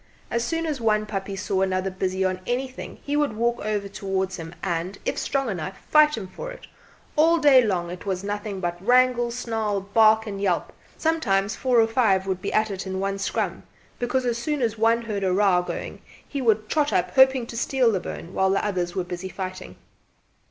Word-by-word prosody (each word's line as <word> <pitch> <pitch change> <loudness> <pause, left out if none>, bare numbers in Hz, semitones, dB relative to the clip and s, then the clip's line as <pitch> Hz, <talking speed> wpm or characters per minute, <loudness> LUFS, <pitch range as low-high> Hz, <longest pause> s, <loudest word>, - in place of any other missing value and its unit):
As 235 0 0
soon 330 +6 -1
as 295 -6 -3
one 215 -1 +2
puppy 195 -2 -4
saw 190 0 -1
another 190 0 0
busy 190 0 -1
on 185 0 -1
anything, 255 +1 -3
he 285 - -2
would 295 -5 +1
walk 235 +2 0
over 205 -1 -1
towards 190 -1 -2
him 165 0 -8
and, 180 +1 -2
if - - 0
strong 275 -2 -1
enough, 190 -2 -4
fight 305 -2 +6
him 210 - -5
for - - -7
it. - - -11 0.5
All 325 +2 +5
day 285 -5 +6
long 175 -5 -1
it 180 - -8
was 190 -2 -2
nothing 205 -1 -4
but 175 0 -3
wrangle, 245 +1 +4
snarl, 225 -4 -2
bark 220 +2 +4
and 200 -2 -5
yelp. 185 -4 0 0.2
Sometimes 210 -12 +1
four 250 -2 +2
or 225 - +6
five 225 -5 +2
would 190 -1 -2
be - - -3
at 215 0 +1
it 195 0 -5
in 190 0 -3
one 195 0 -2
scrum; 195 - -2 0.4
because 250 +1 0
as 235 -1 0
soon 295 +2 -1
as 225 -2 0
one 230 +1 +2
heard 210 -3 -3
a 190 - +2
row 190 -2 +3
going 180 - -5
on - - -17 0.3
he 280 - -4
would 220 -3 +2
trot 300 +2 +1
up - - +1
hoping 265 -2 +5
to 235 - -9
steal 245 0 +2
the 195 - 0
bone 175 0 -7
while 190 0 +2
the 195 +2 +1
others 180 -4 -2
were 185 - 0
busy 180 +1 -6
fighting. 185 -1 -6
210 Hz, 210 wpm, -24 LUFS, 190-245 Hz, 0.5 s, fight